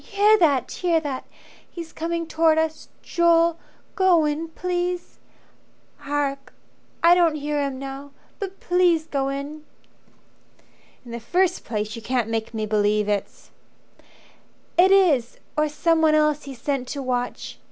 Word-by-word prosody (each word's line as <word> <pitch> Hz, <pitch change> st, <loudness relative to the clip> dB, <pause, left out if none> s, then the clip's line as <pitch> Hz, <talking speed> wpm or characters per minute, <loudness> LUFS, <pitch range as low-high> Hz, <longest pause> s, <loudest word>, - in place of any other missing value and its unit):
Hear 415 Hz, +1 st, +4 dB
that, 280 Hz, -7 st, +2 dB
hear 345 Hz, -3 st, +1 dB
that! 280 Hz, -4 st, -5 dB, 0.4 s
He's 335 Hz, -2 st, -9 dB
coming 335 Hz, +1 st, -3 dB
towards 320 Hz, 0 st, +2 dB
us. 320 Hz, 0 st, -3 dB
Joel, 335 Hz, -1 st, +3 dB, 0.3 s
go 370 Hz, -6 st, +4 dB
in 300 Hz, +2 st, -2 dB
please. 355 Hz, +1 st, -3 dB, 0.8 s
Hark! 280 Hz, -1 st, -3 dB, 0.5 s
I 340 Hz, +1 st, +8 dB
don't 340 Hz, -3 st, +3 dB
hear 295 Hz, 0 st, -2 dB
him 275 Hz, -2 st, -2 dB
now. 275 Hz, +1 st, -7 dB, 0.3 s
But 390 Hz, -1 st, -6 dB
please 355 Hz, -3 st, +2 dB
go 275 Hz, -3 st, -1 dB
in." 285 Hz, +2 st, -6 dB, 1.4 s
"In 240 Hz, -, -10 dB
the 235 Hz, -, -5 dB
first 360 Hz, +10 st, 0 dB
place 215 Hz, -1 st, -3 dB
you 230 Hz, -, -8 dB
can't 240 Hz, -1 st, -1 dB
make 225 Hz, -1 st, -2 dB
me 220 Hz, -2 st, -3 dB
believe 210 Hz, 0 st, +1 dB
it's 205 Hz, -2 st, -3 dB, 0.6 s
" -, -, -27 dB, 0.5 s
"It 370 Hz, +2 st, +5 dB
is 320 Hz, -12 st, +3 dB, 0.2 s
or 305 Hz, 0 st, +1 dB
someone 320 Hz, +1 st, +2 dB
else 300 Hz, -1 st, +2 dB
he's 270 Hz, -3 st, -9 dB
sent 270 Hz, 0 st, -2 dB
to 280 Hz, 0 st, -5 dB
watch. 245 Hz, -1 st, -3 dB
300 Hz, 140 wpm, -23 LUFS, 265-335 Hz, 1.4 s, I